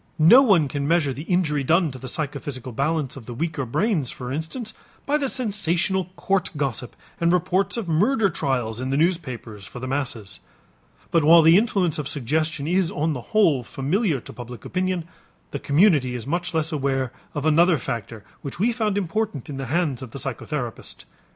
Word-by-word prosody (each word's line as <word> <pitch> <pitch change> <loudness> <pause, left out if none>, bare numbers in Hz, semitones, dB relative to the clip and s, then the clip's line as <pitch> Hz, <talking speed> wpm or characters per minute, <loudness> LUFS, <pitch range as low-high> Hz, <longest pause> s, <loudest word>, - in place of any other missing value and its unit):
No 170 +12 +8
one 195 - +4
can 140 +1 -3
measure 160 -4 +2
the 135 - -7
injury 155 -6 +1
done 165 +2 +3
to 130 - -9
the 130 - -7
psychophysical 140 -2 -4
balance 140 +2 -1
of 130 -5 -11
the 120 - -6
weaker 150 -2 -2
brains, 165 - 0
for 125 -1 -6
instance, 185 - -4 0.3
by 290 - +1
the 280 -3 0
sensational 190 -6 0
court 190 0 0
gossip 130 -4 -3 0.2
and 170 0 +3
reports 180 +4 +1
of 225 -6 -3
murder 205 - +3
trials 130 - -2
in 130 - -3
the 135 - +1
newspapers 130 - -2
for - - -9
the 125 - -5
masses. 125 -7 -3 0.7
But 165 -2 +3
while 165 +2 +8
the 165 +2 +7
influence 195 -7 +2
of 145 - -3
suggestion 150 +3 -1
is 180 +1 +2
on 155 +2 -1
the 125 - -5
whole 170 -12 +4
familiar 150 - -1
to - - -11
public 120 -3 -9
opinion, 185 -2 -1 0.5
the 140 - -3
community 145 -5 +3
is 115 -2 -5
much 175 +3 -2
less 160 +1 0
aware 135 -4 -1 0.2
of 145 0 -2
another 165 +2 +5
factor 115 -4 -5 0.2
which 140 - -6
we 225 +6 +2
found 215 -4 -1
important 185 - -2
in 135 - -5
the 135 -1 -4
hands 150 -3 0
of 130 - -7
the 125 - -8
psychotherapist. 135 -2 -5
155 Hz, 185 wpm, -23 LUFS, 135-180 Hz, 0.7 s, No